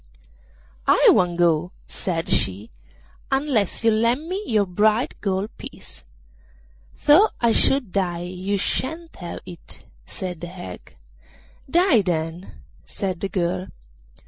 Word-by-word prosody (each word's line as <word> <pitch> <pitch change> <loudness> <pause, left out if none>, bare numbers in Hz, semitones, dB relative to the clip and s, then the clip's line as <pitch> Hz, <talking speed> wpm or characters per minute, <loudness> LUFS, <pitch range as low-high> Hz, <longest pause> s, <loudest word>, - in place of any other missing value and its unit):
'I - - +6
won't 175 -2 +2
go,' 175 +1 +2
said 170 -4 -3
she, 100 +4 0 0.6
'unless 270 -7 0
you 225 - +6
lend 235 +8 +1
me 380 +4 -3
your 215 -3 +2
bright 210 +6 +1
gold 195 +1 -2
piece.' - - -11 1.0
'Though 355 +9 +7
I 235 -1 +3
should 260 -3 +3
die 175 -3 -1
you 185 +3 -3
shan't 320 - -2
have 175 -1 -7
that,' 175 -2 -10 0.3
said 180 -3 -6
the 175 - -5
hag. 175 - -10 0.7
'Die, 335 - +4
then,' 170 -1 -3 0.3
said 185 -3 -4
the 195 - -3
girl. 180 0 -1
195 Hz, 120 wpm, -23 LUFS, 175-235 Hz, 1.0 s, Though